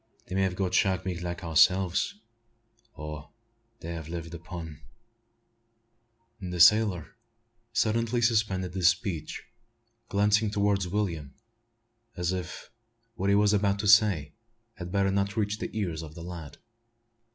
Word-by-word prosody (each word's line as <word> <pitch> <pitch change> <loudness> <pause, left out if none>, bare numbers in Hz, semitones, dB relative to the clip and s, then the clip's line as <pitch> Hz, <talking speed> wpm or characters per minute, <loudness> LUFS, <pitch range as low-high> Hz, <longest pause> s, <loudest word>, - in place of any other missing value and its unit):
They 90 - -8
may 95 - +1
have 95 -2 0
got 95 -1 -2
shark 95 0 +2
meat 90 -2 -3
like 85 0 -5
ourselves; 90 +4 +3 0.8
or 75 -1 -7 0.5
they 85 +1 -5
have 80 -2 -7
lived 85 0 -6
upon 85 -2 -8 0.8
" 115 -1 -43
The 90 -2 -5
sailor 95 -3 +5 0.6
suddenly 115 +2 +1
suspended 105 -6 +1
his 95 -2 +3
speech, 90 -5 -1 0.7
glancing 105 +1 +2
towards 100 -2 +1
William, 85 -8 -3 0.8
as 90 0 0
if 90 0 -6 0.4
what 100 -3 -1
he 100 - +4
was 105 0 +4
about 100 -1 +2
to 105 +1 -2
say 100 -9 +4 0.4
had 90 -4 -8
better 100 0 +2
not 100 +2 -1
reach 105 0 -1
the - - -4
ears 85 -7 -2
of 80 -1 -10
the 85 - -8
lad. 85 -4 -8
95 Hz, 140 wpm, -28 LUFS, 85-105 Hz, 0.8 s, sailor